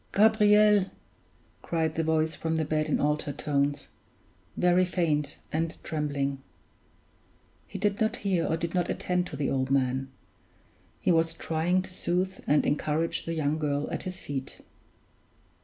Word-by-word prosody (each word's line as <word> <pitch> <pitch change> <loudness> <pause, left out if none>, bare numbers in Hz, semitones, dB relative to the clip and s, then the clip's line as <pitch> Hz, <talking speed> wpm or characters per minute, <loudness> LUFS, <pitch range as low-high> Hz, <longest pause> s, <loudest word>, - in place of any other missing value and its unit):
"Gabriel!" 210 -1 +5 0.8
cried 160 -2 -1
the 165 - -1
voice 160 0 +1
from 160 +1 -2
the 160 -1 0
bed 155 +1 0
in - - +1
altered 150 -1 0
tones 145 0 -1 0.7
very 180 +1 +4
faint 155 -5 0
and 160 +1 -1
trembling. 140 -3 -2 1.3
He - - -7
did 205 +1 0
not 220 - +2
hear 190 -4 0
or 160 - 0
did 170 0 -3
not 180 -1 0
attend 180 0 -1
to - - -7
the 140 0 -1
old 130 -1 0
man. 130 0 +1 0.9
He - - +2
was 165 0 +2
trying 170 +3 0
to 185 - -9
soothe 185 +1 -1
and 150 - +3
encourage 155 +3 0
the 165 - -3
young 155 0 0
girl 145 -1 -1
at - - -2
his 185 -1 -4
feet. 135 -2 -6
160 Hz, 150 wpm, -28 LUFS, 145-180 Hz, 1.3 s, Gabriel